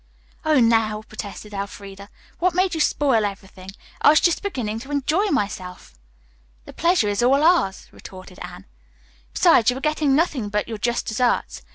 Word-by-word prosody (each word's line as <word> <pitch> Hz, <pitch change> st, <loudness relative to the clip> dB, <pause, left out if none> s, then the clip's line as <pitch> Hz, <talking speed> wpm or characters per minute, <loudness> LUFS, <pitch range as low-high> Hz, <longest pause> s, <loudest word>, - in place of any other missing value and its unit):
"Oh, 310 Hz, -3 st, +3 dB
now," 225 Hz, -2 st, +2 dB
protested 210 Hz, -1 st, -9 dB
Elfreda, 200 Hz, 0 st, -8 dB, 0.3 s
"what 360 Hz, -1 st, +1 dB
made 370 Hz, 0 st, +1 dB
you 320 Hz, -, -3 dB
spoil 270 Hz, -8 st, +2 dB
everything? 195 Hz, -2 st, -7 dB, 0.3 s
I -, -, +6 dB
was 310 Hz, -, +6 dB
just 345 Hz, -, +1 dB
beginning 245 Hz, -, -4 dB
to 270 Hz, +4 st, -11 dB
enjoy 295 Hz, +7 st, 0 dB
myself." 190 Hz, -, -4 dB, 0.7 s
"The -, -, -12 dB
pleasure 335 Hz, -, +2 dB
is 205 Hz, +1 st, -1 dB
all 270 Hz, +4 st, +3 dB
ours," 325 Hz, -, +2 dB
retorted 185 Hz, -1 st, -13 dB
Anne. -, -, -9 dB, 0.7 s
"Besides, 225 Hz, -, +4 dB
you 250 Hz, -, -1 dB
are -, -, -5 dB
getting 300 Hz, -1 st, +1 dB
nothing 285 Hz, -9 st, 0 dB
but 210 Hz, 0 st, -2 dB
your 225 Hz, -2 st, -6 dB
just 240 Hz, +2 st, -1 dB
deserts. 240 Hz, +2 st, -1 dB
235 Hz, 165 wpm, -22 LUFS, 205-300 Hz, 0.7 s, I